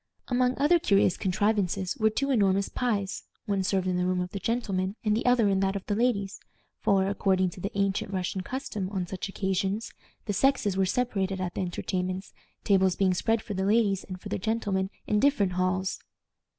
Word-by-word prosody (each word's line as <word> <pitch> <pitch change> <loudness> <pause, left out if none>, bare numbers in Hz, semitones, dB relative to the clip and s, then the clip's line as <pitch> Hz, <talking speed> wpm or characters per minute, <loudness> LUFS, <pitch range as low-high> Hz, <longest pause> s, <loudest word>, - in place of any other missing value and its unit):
Among 250 0 +2
other 305 +5 +4
curious 200 - +3
contrivances 195 -1 0
were 220 -1 +3
two 275 +6 -1
enormous 200 -5 +2
pies, 205 -6 -1 0.2
one 200 -2 0
served 190 0 0
in 180 -1 0
the 180 - +1
room 185 0 +1
of 180 0 -3
the 200 - -4
gentlemen 195 -4 -1
and 210 0 +3
the 230 - -1
other 245 -3 +4
in 195 -1 +2
that 195 0 +1
of 195 - -4
the 205 - -1
ladies; 205 -3 0 0.4
for, 195 -1 +3
according 190 -2 +1
to 180 - -11
the 195 - -2
ancient 195 0 0
Russian 185 0 -2
custom 210 -3 -4
on 190 -3 -2
such 185 +2 -5
occasions, 195 +2 -2 0.3
the 205 - -1
sexes 210 -3 +2
were 190 0 +2
separated 195 -5 -1
at 180 -1 -3
the - - -3
entertainments, 185 +1 -3 0.3
tables 190 -2 +3
being 190 -2 +2
spread 225 +4 0
for 210 - -5
the 190 0 -1
ladies 200 -2 +2
and 185 -1 -8
for - - -8
the - - -2
gentlemen 195 -2 -1 0.2
in 210 - +1
different 245 -8 +3
halls. 185 +1 0
195 Hz, 195 wpm, -28 LUFS, 185-215 Hz, 0.4 s, other